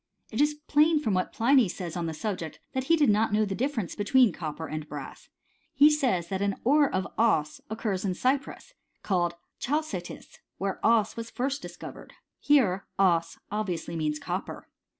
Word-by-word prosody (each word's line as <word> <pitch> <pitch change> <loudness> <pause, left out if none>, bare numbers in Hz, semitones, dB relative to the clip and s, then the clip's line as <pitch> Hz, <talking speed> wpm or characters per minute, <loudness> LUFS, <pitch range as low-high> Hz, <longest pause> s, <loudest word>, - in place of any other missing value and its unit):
It - - 0
is 295 0 +3
plain 300 +1 +3
from 220 -9 -1
what 185 -1 0
Pliny 245 -2 +4
says 175 -2 -5
on 170 -2 -2
the 160 - -3
subject, 165 -4 -4
that 260 0 -2
he 330 - +4
did 295 -8 +4
not 215 +1 +2
know 215 +1 +3
the 195 - -3
difference 230 - -2
between 230 0 +3
copper 160 0 -5
and 155 -1 -6
brass; 145 -2 -8 0.5
he 290 +2 +7
says, 245 - 0
that 190 0 -2
an 200 -1 +1
ore 290 +3 +4
of 185 0 -1
as 210 -10 +2
occurs 210 -4 -2
in 190 -3 -1
Cyprus, 275 - -1 0.3
called 175 -3 0 0.2
chaldtisy 270 - -3 0.3
where 195 0 -3
cea 225 -2 +3
was 230 0 -6
first 270 +4 -2
discor - - -8
vered. - - -13 0.3
Here 220 -10 +3
(bs 175 -4 +2
obviously 180 -6 -3
means 155 -2 -1
copper. - - -5
210 Hz, 175 wpm, -28 LUFS, 175-265 Hz, 0.5 s, he